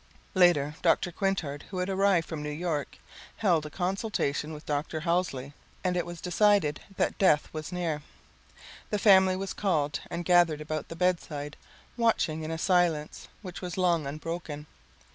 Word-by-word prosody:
Later 175 -6 +4
Dr. 175 +1 +2
Quintard, 170 -6 -2
who 185 - -6
had 180 0 -1
arrived 195 -3 +2
from 160 -3 -5
New 150 - -4
York, 150 -1 -3 0.4
held 170 -7 +2
a - - -8
consultation 180 -4 -1
with 150 0 -9
Dr. 150 +2 -2
Halsey, 165 -5 -1 0.3
and 180 -1 +1
it 175 - -1
was 175 -1 -7
decided 180 -4 +3 0.2
that - - 0
death 150 -7 +4
was 155 -1 -5
near. 170 -4 -2 0.9
The 210 - 0
family 190 -2 +6
was 195 0 -4
called 150 -7 0
and 170 0 -4
gathered 175 -3 +4
about 155 0 -4
the 165 - -8
bedside 165 -5 -1 0.4
watching 220 -9 +1
in 155 - -4
a 165 - -2
silence 170 -4 +1 0.2
which 180 -2 -7
was 180 -1 -5
long 170 -5 +2
unbroken. 155 0 -5
170 Hz, 160 wpm, -28 LUFS, 150-185 Hz, 0.9 s, family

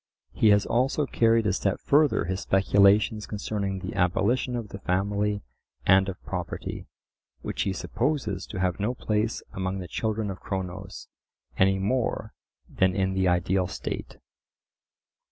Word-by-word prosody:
He 110 - +2
has 100 -1 +5
also 135 +5 +1
carried 115 -3 +3
a 100 - +2
step 95 0 0
further 145 - +3
his 95 +2 -2
speculations 100 +2 +3
concerning 100 -2 -3
the 95 0 -6
abolition 110 +7 +1
of 115 -4 -4
the 100 - -8
family 100 +2 0 0.4
and 95 0 +5
of 90 - -6
property, - - -5 0.6
which - - -3
he 95 - 0
supposes 115 - -2
to 95 - -6
have 90 +1 0
no 110 +5 -1
place 110 -1 -1
among 95 0 -2
the 90 -2 -6
children 110 +1 -2
of 95 - -8
Cronos 95 -2 -5 0.5
any 95 0 +3
more 110 +2 -1 0.3
than 95 0 +1
in 95 -1 +1
the 95 -1 +1
ideal 90 +1 +2
state. - - -5
100 Hz, 145 wpm, -26 LUFS, 95-110 Hz, 0.6 s, has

